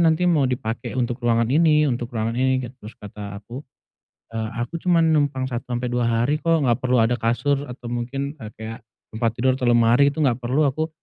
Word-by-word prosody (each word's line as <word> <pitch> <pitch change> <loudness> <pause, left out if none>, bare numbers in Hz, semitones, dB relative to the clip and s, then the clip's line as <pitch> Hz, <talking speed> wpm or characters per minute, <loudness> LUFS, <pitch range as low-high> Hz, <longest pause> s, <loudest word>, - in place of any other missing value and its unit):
nanti 160 +2 +3
mau 155 -5 +3
dipake 120 -3 -3
untuk 120 -1 -1
ruangan 115 -1 +2
ini, 150 0 +4
untuk 120 -1 -3
ruangan 115 +1 -2
ini," 130 +1 +2
gitu. 120 - -12
Terus 110 - -9
kata 100 -1 -8
aku, 125 +6 -9 0.7
"Eee, 110 -1 -2
aku 160 +8 -4
cuman 170 -2 +3
numpang 145 -3 +1
1 120 -2 -4
sampe 120 0 -2
2 120 -1 0
hari, 120 +7 +1
kok, 165 -3 +2
enggak 120 +1 +2
perlu 125 0 +2
ada 120 +2 +2
kasur 140 +5 0
atau 125 -1 -8
mungkin, 135 +4 -3
eee, 110 -3 -7
kayak 110 +1 -7 0.3
tempat 115 +1 +1
tidur 130 +2 +2
atau 125 -2 -2
lemari, 120 +4 +5
itu 145 - -9
enggak 125 -3 +2
perlu 130 +5 +1
aku. 155 +4 -1
125 Hz, 205 wpm, -22 LUFS, 115-140 Hz, 0.7 s, lemari